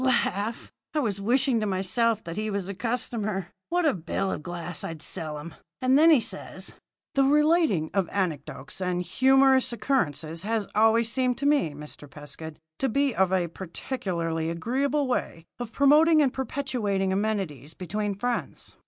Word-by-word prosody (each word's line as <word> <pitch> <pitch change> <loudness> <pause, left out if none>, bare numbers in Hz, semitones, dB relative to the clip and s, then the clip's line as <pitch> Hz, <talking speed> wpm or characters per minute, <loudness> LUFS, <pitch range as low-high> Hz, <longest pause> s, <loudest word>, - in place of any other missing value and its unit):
Laugh! 235 -3 0 0.2
I - - +3
was 205 -8 -1
wishing 250 +3 +2
to 215 - -1
myself 205 +4 +1
that 170 0 -6
he 215 +2 -2
was 200 -3 -2
a 200 - -4
customer. 215 -4 -2 0.2
What 350 0 +1
a 305 - +4
bill 190 +2 -2
of - - -3
glass 175 -2 -5
I'd 165 -1 -5
sell 155 0 -4
him! 155 +2 -8 0.3
And 255 +1 +3
then 315 +4 +7
he 310 -5 +7
says: - - -4 0.4
"'The 275 - +4
relating 300 - +3
of 195 -4 +1
anecdotes 170 -4 -3
and 180 -1 0
humorous 265 +4 +4
occurrences 165 - -1
has 220 0 -1
always 225 +1 +4
seemed 255 -1 +1
to 280 - -3
me, 285 - +2
Mr. 150 -1 -10
Pescud, 150 +2 -9 0.2
to 270 - +1
be 275 +2 +1
a 190 -3 +2
particularly 170 -3 -3
agreeable 270 - 0
way 165 -9 -2
of 240 -2 -5
promoting 305 +4 +5
and 275 -4 +3
perpetuating 235 -8 -1
amenities 190 - -2
between 205 +2 -3
friends. 245 +4 -4
210 Hz, 160 wpm, -26 LUFS, 175-260 Hz, 0.4 s, then